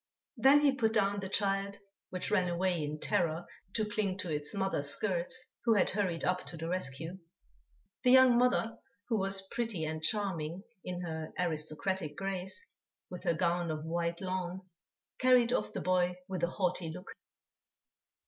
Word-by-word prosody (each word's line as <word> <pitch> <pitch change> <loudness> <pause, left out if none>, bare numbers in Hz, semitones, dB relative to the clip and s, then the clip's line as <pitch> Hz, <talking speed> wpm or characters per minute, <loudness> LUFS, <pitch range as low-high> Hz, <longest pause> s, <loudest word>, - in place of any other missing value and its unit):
Then 270 +4 +6
he 290 -2 +5
put 230 -5 +1
down 200 -2 +2
the 190 -1 -5
child, 200 0 +1 0.3
which 185 - -2
ran 185 -4 +3
away 175 -1 0
in 150 +1 -4
terror 165 +1 0 0.3
to 220 - +2
cling 205 -3 -1
to 185 -3 -3
its 150 -1 -2
mother's 190 -8 0
skirts, 195 - -1 0.2
who 230 -2 +4
had 205 - +3
hurried 185 -4 -1
up 180 0 +1
to 170 - -7
the 165 +1 -4
rescue. 170 0 -2 0.8
The 250 - +3
young 260 -1 +8
mother, 240 -2 +2 0.3
who 225 -3 +2
was 195 0 +2
pretty 225 -9 -2
and 155 0 -3
charming 180 -2 0 0.2
in 180 -1 -4
her 160 -2 -5
aristocratic 160 0 -1
grace, 190 0 -2 0.4
with 180 - -7
her 170 - +2
gown 175 0 +1
of 155 0 -3
white 170 +1 -2
lawn, 185 0 -3 0.5
carried 250 -2 +5
off - - 0
the - - -4
boy 180 -1 +2
with 185 -2 -4
a 170 - +2
haughty 180 -2 -1
look. 180 +5 -8
185 Hz, 165 wpm, -32 LUFS, 170-205 Hz, 0.8 s, young